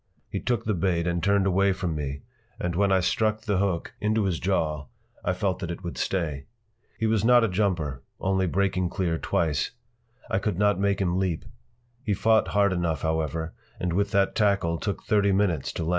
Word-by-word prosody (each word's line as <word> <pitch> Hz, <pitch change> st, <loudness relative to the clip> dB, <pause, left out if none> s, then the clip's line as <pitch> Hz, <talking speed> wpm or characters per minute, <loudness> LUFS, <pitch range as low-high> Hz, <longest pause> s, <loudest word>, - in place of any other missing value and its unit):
He -, -, -2 dB
took 120 Hz, -3 st, -1 dB
the 110 Hz, -, +1 dB
bait 85 Hz, -2 st, 0 dB
and 85 Hz, -1 st, 0 dB
turned 100 Hz, 0 st, +3 dB
away 95 Hz, +1 st, +3 dB
from 90 Hz, -3 st, -2 dB
me, 70 Hz, -2 st, -4 dB, 0.4 s
and 90 Hz, -1 st, -1 dB
when 100 Hz, +1 st, +2 dB
I 95 Hz, -1 st, +4 dB
struck 110 Hz, +3 st, +1 dB
the 100 Hz, -3 st, 0 dB
hook 95 Hz, -4 st, -1 dB
into 110 Hz, 0 st, +1 dB
his 90 Hz, -5 st, 0 dB
jaw 75 Hz, -6 st, -1 dB, 0.4 s
I 90 Hz, -, +1 dB
felt 95 Hz, 0 st, -1 dB
that 90 Hz, -, -4 dB
it 85 Hz, +2 st, -6 dB
would 85 Hz, -, -5 dB
stay. 75 Hz, -7 st, -2 dB, 0.5 s
He 110 Hz, -, -1 dB
was 110 Hz, -2 st, +2 dB
not 120 Hz, +1 st, +6 dB
a -, -, +3 dB
jumper—only 95 Hz, -1 st, -1 dB
breaking 95 Hz, 0 st, 0 dB
clear 85 Hz, -3 st, -1 dB
twice. 75 Hz, -4 st, 0 dB, 0.6 s
I 110 Hz, -2 st, 0 dB
could 100 Hz, -3 st, -2 dB
not 105 Hz, -1 st, +2 dB
make 100 Hz, 0 st, +1 dB
him 90 Hz, -1 st, +1 dB
leap. 90 Hz, -4 st, -1 dB, 0.6 s
He 105 Hz, -6 st, 0 dB
fought 110 Hz, +2 st, +3 dB
hard 100 Hz, -1 st, +2 dB
enough, 85 Hz, -4 st, -1 dB
however, 80 Hz, 0 st, -1 dB, 0.3 s
and 90 Hz, -1 st, -1 dB
with 100 Hz, +3 st, +1 dB
that 100 Hz, -2 st, +2 dB
tackle 95 Hz, -6 st, +1 dB
took 100 Hz, -, -3 dB
thirty 100 Hz, -2 st, +3 dB
minutes 95 Hz, -7 st, +1 dB
to -, -, -3 dB
land. 80 Hz, -, -2 dB
95 Hz, 195 wpm, -26 LUFS, 85-100 Hz, 0.6 s, not